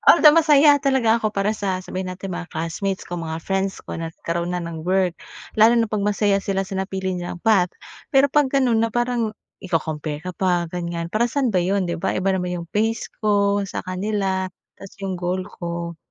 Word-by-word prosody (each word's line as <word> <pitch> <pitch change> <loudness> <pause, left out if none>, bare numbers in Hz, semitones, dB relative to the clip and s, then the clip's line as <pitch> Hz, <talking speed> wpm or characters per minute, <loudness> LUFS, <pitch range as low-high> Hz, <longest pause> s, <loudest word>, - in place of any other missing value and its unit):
Although, 305 -2 +8
masaya 295 -2 +6
talaga 265 -5 +3
ako 215 - 0
para 210 +1 0
sa, 195 -3 -1
sabihin 185 0 -4
natin, 185 0 -6
mga 175 - -6
classmates 185 +4 -3
ko, 175 - -5
mga 160 -1 -4
friends 195 0 -1
ko, - - -5
na 165 -1 -4
nagkaroon 170 +1 -3
na - - 0
nang 165 -1 -6
work, 185 0 +1 0.4
lalo 225 +2 +6
na 230 - +3
'pag 210 -1 -2
masaya 205 -1 +2
sila 195 -1 -1
sa 195 - -6
napili 190 -1 -2
nilang 175 0 -5
path. 195 -6 +4 0.4
Pero 275 -2 +5
'pag 290 -2 +3
gano’n 250 -5 +3
na 230 - +1
parang 240 -1 0 0.3
iko-compare 160 -3 -3
ka 185 - -3
pa, 175 -2 +1
ganyan, 170 -1 -3
para 235 +4 +1
saan 260 -6 0
ba 180 - +3
'yon, 190 +1 +1
’di 170 0 -3
ba? - - +1
Iba 190 +1 +1
naman 180 -1 -2
'yong 170 -1 -8
phase 225 +2 0 0.2
ko 205 -1 +2
sa 195 - -5
kanila, 190 0 -1 0.2
tas 195 - -12
yung 190 -1 -2
goal 180 +1 -2
ko. 170 -3 -5
195 Hz, 200 wpm, -22 LUFS, 175-215 Hz, 0.4 s, Although